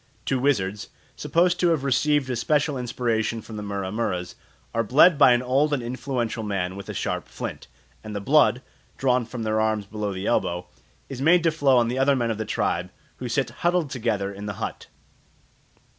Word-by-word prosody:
Two 135 Hz, -, 0 dB
wizards, 105 Hz, -7 st, 0 dB, 0.3 s
supposed 175 Hz, +1 st, +1 dB
to 180 Hz, -, +3 dB
have 160 Hz, -5 st, +1 dB
received 140 Hz, +1 st, +2 dB
a -, -, -1 dB
special 145 Hz, +4 st, +1 dB
inspiration 120 Hz, -2 st, -1 dB
from 110 Hz, 0 st, -10 dB
the 105 Hz, -, -5 dB
Mura 100 Hz, -2 st, -4 dB
muras, 95 Hz, -5 st, -2 dB, 0.4 s
are 115 Hz, -, +1 dB
bled 150 Hz, -, +6 dB
by 130 Hz, -, +6 dB
an 120 Hz, 0 st, +3 dB
old 140 Hz, +4 st, +2 dB
and 130 Hz, -4 st, -1 dB
influential 120 Hz, -2 st, -3 dB
man 95 Hz, -3 st, -2 dB
with 100 Hz, -, -9 dB
a -, -, -3 dB
sharp -, -, -3 dB
flint; -, -, -7 dB, 0.4 s
and 110 Hz, -1 st, -7 dB
the -, -, -1 dB
blood, 135 Hz, +2 st, +3 dB, 0.3 s
drawn 125 Hz, -2 st, +2 dB
from 120 Hz, -1 st, -5 dB
their 110 Hz, 0 st, +1 dB
arms 110 Hz, -1 st, 0 dB
below 105 Hz, 0 st, -4 dB
the 95 Hz, +1 st, -5 dB
elbow, 90 Hz, -6 st, 0 dB, 0.4 s
is 135 Hz, -2 st, -7 dB
made 165 Hz, +4 st, +5 dB
to 165 Hz, -, +3 dB
flow 140 Hz, -4 st, +3 dB
on 120 Hz, -1 st, +3 dB
the 125 Hz, +3 st, -2 dB
other 135 Hz, +1 st, +4 dB
men 120 Hz, -3 st, 0 dB
of 110 Hz, -, -4 dB
the 110 Hz, -, -2 dB
tribe, 90 Hz, -3 st, -1 dB, 0.3 s
who 125 Hz, -, -5 dB
sit 120 Hz, 0 st, 0 dB
huddled 175 Hz, -4 st, +1 dB
together 100 Hz, -5 st, -1 dB
in 100 Hz, +1 st, -7 dB
the 100 Hz, -, -3 dB
hut. -, -, -5 dB
120 Hz, 200 wpm, -24 LUFS, 105-135 Hz, 0.4 s, bled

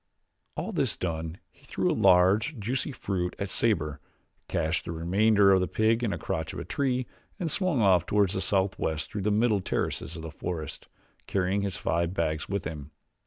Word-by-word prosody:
All -, -, -3 dB
this -, -, +1 dB
done 80 Hz, -1 st, -3 dB
he -, -, -27 dB
threw -, -, 0 dB
a -, -, +2 dB
large, 95 Hz, -, +4 dB
juicy 120 Hz, +7 st, -2 dB
fruit 90 Hz, -8 st, -2 dB
at 100 Hz, -, -3 dB
Sabor, 80 Hz, -12 st, 0 dB, 0.5 s
cached 80 Hz, +1 st, 0 dB
the -, -, -4 dB
remainder 100 Hz, +5 st, +4 dB
of 95 Hz, -, +5 dB
the 90 Hz, -, 0 dB
pig 115 Hz, +2 st, +2 dB
in 110 Hz, -, +1 dB
a -, -, -2 dB
crotch 80 Hz, 0 st, -3 dB
of -, -, -6 dB
the 85 Hz, -, -5 dB
tree 130 Hz, +4 st, 0 dB, 0.3 s
and 170 Hz, -4 st, -1 dB
swung 180 Hz, -, +1 dB
off 90 Hz, -4 st, +4 dB
toward 100 Hz, -2 st, +3 dB
the 95 Hz, -, -2 dB
southwest 95 Hz, -5 st, 0 dB
through 105 Hz, -, -3 dB
the 105 Hz, -, +1 dB
middle 105 Hz, -1 st, +2 dB
terraces 80 Hz, -2 st, -2 dB
of 80 Hz, -, -7 dB
the 80 Hz, -, -6 dB
forest, 80 Hz, -1 st, -5 dB, 0.4 s
carrying 95 Hz, +1 st, +1 dB
his 100 Hz, -2 st, -2 dB
five 85 Hz, +2 st, -1 dB
bags 80 Hz, -3 st, -1 dB
with 100 Hz, 0 st, -2 dB
him. 75 Hz, -2 st, -6 dB
95 Hz, 190 wpm, -28 LUFS, 80-105 Hz, 0.5 s, of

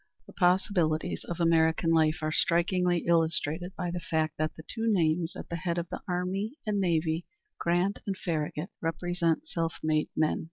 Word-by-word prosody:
The -, -, -14 dB
possibilities 180 Hz, -3 st, +1 dB
of 175 Hz, -, -5 dB
American 165 Hz, 0 st, +3 dB
life 160 Hz, 0 st, +3 dB
are 155 Hz, -, 0 dB
strikingly 175 Hz, +1 st, +2 dB
illustrated 165 Hz, +1 st, +1 dB
by 175 Hz, -1 st, -2 dB
the 175 Hz, -, -3 dB
fact 160 Hz, -2 st, -1 dB
that 155 Hz, 0 st, -1 dB
the 160 Hz, -, -10 dB
two 225 Hz, -1 st, -1 dB
names 165 Hz, -3 st, +1 dB
at -, -, -7 dB
the 170 Hz, -, -2 dB
head 170 Hz, 0 st, -2 dB
of 170 Hz, 0 st, -2 dB
the -, -, -5 dB
army 190 Hz, +6 st, -2 dB
and 210 Hz, -2 st, 0 dB
navy, 165 Hz, -2 st, 0 dB, 0.3 s
Grant 175 Hz, +4 st, +1 dB
and 195 Hz, -1 st, -1 dB
Farragut, 155 Hz, +1 st, -3 dB
represent 175 Hz, -, 0 dB
self 165 Hz, -, -2 dB
made 155 Hz, -1 st, +1 dB
men. 155 Hz, 0 st, +2 dB
170 Hz, 170 wpm, -29 LUFS, 160-180 Hz, 0.3 s, American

